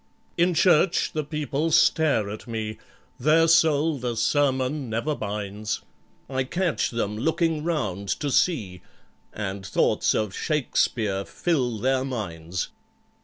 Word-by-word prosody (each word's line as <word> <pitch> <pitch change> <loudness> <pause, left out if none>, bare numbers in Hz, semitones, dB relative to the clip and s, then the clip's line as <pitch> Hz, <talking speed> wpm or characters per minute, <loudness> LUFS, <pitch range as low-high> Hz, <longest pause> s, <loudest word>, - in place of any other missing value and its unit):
"In 175 0 +2
church 175 +1 +3
the 155 - -1
people 150 +1 -2
stare 150 -8 +3
at 110 +4 -8
me, 110 -2 -4 0.4
Their 160 +2 +4
soul 160 -2 +3
the 120 -2 -3
sermon 135 0 +1
never 115 +8 -1
binds; 105 -2 -4 0.4
I 130 0 -1
catch 175 +5 0
them 105 -3 -2
looking 160 - 0
round 105 - -2
to 145 -2 -2
see, 105 - +1 0.5
And 100 -2 -5
thoughts 95 - +1
of 105 -3 -1
SHAKESPEARE 110 -9 0
fill 130 -10 -1
their 130 +4 +1
minds. 90 -9 -4
130 Hz, 120 wpm, -25 LUFS, 105-155 Hz, 0.5 s, Their